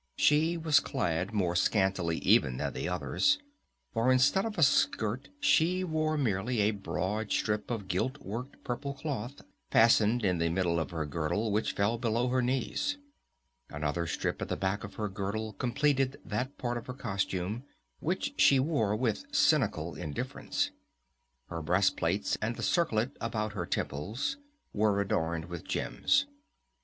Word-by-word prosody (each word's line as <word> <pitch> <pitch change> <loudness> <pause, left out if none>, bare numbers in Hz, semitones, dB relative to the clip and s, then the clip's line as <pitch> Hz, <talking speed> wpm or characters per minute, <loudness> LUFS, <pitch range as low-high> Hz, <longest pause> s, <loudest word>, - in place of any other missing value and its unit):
She 160 +3 +3
was 160 -4 +4
clad 90 -7 -1
more 90 -5 0
scantily 95 -3 +2
even 65 -1 +4
than - - -2
the - - -3
others; 285 - +2 0.6
for 115 +3 +3
instead 145 - +4
of 220 -2 -4
a 165 - +4
skirt 125 -3 +2
she 185 - +3
wore 155 -2 0
merely 115 -2 0
a 105 +1 +3
broad 105 +1 -3
strip 105 0 0
of 110 -5 -3
gilt 95 +10 -1
worked 125 +3 -7
purple 140 +3 -4
cloth 135 -2 -5 0.3
fastened 115 0 +4
to 95 -3 +3
the 85 -1 0
middle 85 -1 +1
of 80 - -2
her 80 -3 -3
girdle 85 +9 -1
which 105 +2 0
fell 105 +4 +1
below 120 +1 +1
her 130 0 +2
knees. 135 - -1 0.7
Another 75 +3 -2
strip - - -2
at - - -3
the - - -1
back 95 +2 -1
of 100 - -8
her 105 - -2
girdle 105 +2 -3
completed 135 +4 +1
that 125 +6 -3
part 120 -1 -2
of 115 - -8
her 125 - -5
costume, 100 -2 -2 0.4
which 190 - -2
she 135 - +6
wore 130 -8 +1
with 120 - -1
a 285 - -8
cynical 120 - +2
indifference. 75 -5 -3 0.8
Her 85 -1 -4
breast 95 +4 +2
plates 95 +5 0
and 115 +2 -1
the - - -6
circlet 125 -8 +1
about 110 -2 -2
her 90 -4 -4
temples 105 - -2 0.4
were 105 -1 +2
adorned 85 -4 -1
with 85 -2 -7
gems. 280 - +1
110 Hz, 160 wpm, -30 LUFS, 95-135 Hz, 0.8 s, she